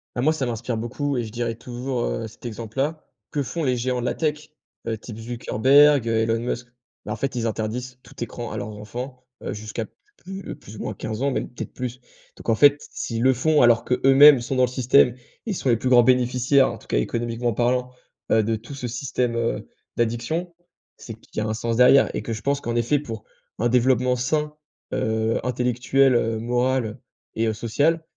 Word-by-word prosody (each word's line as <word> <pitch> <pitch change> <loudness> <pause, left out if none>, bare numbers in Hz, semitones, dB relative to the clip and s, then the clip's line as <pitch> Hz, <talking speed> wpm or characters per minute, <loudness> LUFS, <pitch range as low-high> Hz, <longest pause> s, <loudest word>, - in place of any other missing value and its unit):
Ah 120 - -1
moi, 155 +5 +3
ça 150 -4 -2
m'inspire 120 0 -3
beaucoup 140 +5 -2
et 120 - 0
je 110 - -7
dirais 115 -1 -2
toujours, 125 +1 -4
heu, 115 -1 -3
cet 110 +3 -16
exemple-là, 120 +7 -3 0.3
que 145 -2 -1
font 165 +6 -4
les 130 -3 +1
géants 125 +1 -1
de 120 - -3
la - - -1
tech? 150 -1 -2 0.4
Heu 110 - -1
type 110 0 -10
Zuckerberg, 130 +4 +4
heu, 115 -1 +1
Elon 115 0 +1
Musk? 120 0 -3 0.4
Bah, 105 - -3
en - - -3
fait, 135 +4 -3
ils 120 -2 -1
interdisent 120 +3 -3
tout - - -14
écran 120 +1 -6
à 110 - -4
leurs 105 - -4
enfants, 125 +5 -8 0.2
heu, - - -3
jusqu'à 110 +2 -5
pl - - -24 0.3
plus 195 +1 -7
plus 105 +2 -13
ou - - -10
moins - - -4
15 110 +2 -5
ans, 140 - +2
même 135 - -2
peut-être 120 - -8
plus. 125 0 -5 0.4
Donc - - -7
en 115 - +4
fait, 145 +4 +7
s - - -13
s'ils 115 -1 -3
le 130 +2 +5
font, 150 +5 +3
alors 120 -1 +5
qu'eux-mêmes 135 +2 +7
sont 130 +3 -3
dans 130 - +3
le 125 - +4
système 125 0 +3 0.3
et 220 - -2
sont 140 - -2
les 115 - +4
plus 125 +3 -1
grands 125 -1 +7
bénéficiaires, 125 +2 +3
en - - -8
tout - - -19
cas, - - 0
économiquement 115 - -1
parlant, 125 +2 0 0.4
heu, 110 - +5
de 110 +1 0
tout 115 +6 -9
ce 125 -3 -5
système, 125 -1 -2
heu, 115 0 -2 0.3
d'addiction, 120 +10 -1 0.4
c'est 115 - -8
qu'il 115 - -17
y 110 - 0
a - - -2
un 110 - -1
sens 115 +1 -2
derrière 130 +2 +6
et - - -3
que 115 - -3
je 110 - -6
pense 140 +4 0
qu'en 120 0 -3
effet, 120 +5 +2
pour 115 -7 -6 0.4
un 120 - +2
développement 125 +1 +3
sain, 150 +4 -1 0.4
heu, 110 0 0
intellectuel, 125 +2 +2
heu, 115 -1 +1
moral 120 0 0 0.4
et 115 - +1
heu, 110 - +1
social, 145 +10 +1
120 Hz, 215 wpm, -23 LUFS, 115-130 Hz, 0.4 s, fait